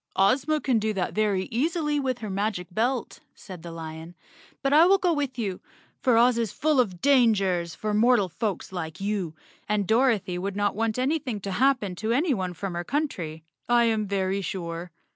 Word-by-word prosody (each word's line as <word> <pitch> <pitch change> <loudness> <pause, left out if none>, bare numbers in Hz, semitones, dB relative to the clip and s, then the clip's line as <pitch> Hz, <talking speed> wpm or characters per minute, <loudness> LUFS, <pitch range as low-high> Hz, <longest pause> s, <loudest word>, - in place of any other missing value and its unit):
" - - -48 0.2
Ozma 295 +4 0
can 255 -6 +1
do 215 0 -1
that 185 -3 -2
very 205 -3 +1
easily 300 +3 0
with 260 -3 -1
her - - -4
magic 200 -2 -1
belt," 240 +6 -1 0.2
said 185 -4 -10
the 170 - -8
lion, 165 +1 -8 0.5
"but 275 +1 +2
I 320 +4 +7
will 390 +1 +6
go 360 -3 +1
with 285 -4 -2
you, 200 -6 -3 0.4
for 250 -3 +3
Oz 240 0 +4
is 230 -3 -1
full 300 -1 +1
of 190 -8 0
dangers 200 - +3
for 215 -1 -3
mortal 225 -1 +4
folks 205 +2 -4
like 165 -1 -5
you, 195 -5 -2 0.3
and 210 -1 +1
Dorothy 220 -5 +2
would 195 +1 -3
noi, 205 0 +1
want 225 +1 -1
anything 260 -4 -1
to 195 - -4
happen 240 -3 +2
to 220 +3 -2
anyone 240 - 0
from 195 +2 -4
her 175 0 -3
coun¬ 295 - 0
try, 160 -2 -7 0.3
I 240 0 +5
am 220 -2 +1
very 195 0 -1
sure." 170 -2 -5
215 Hz, 195 wpm, -26 LUFS, 185-255 Hz, 0.5 s, I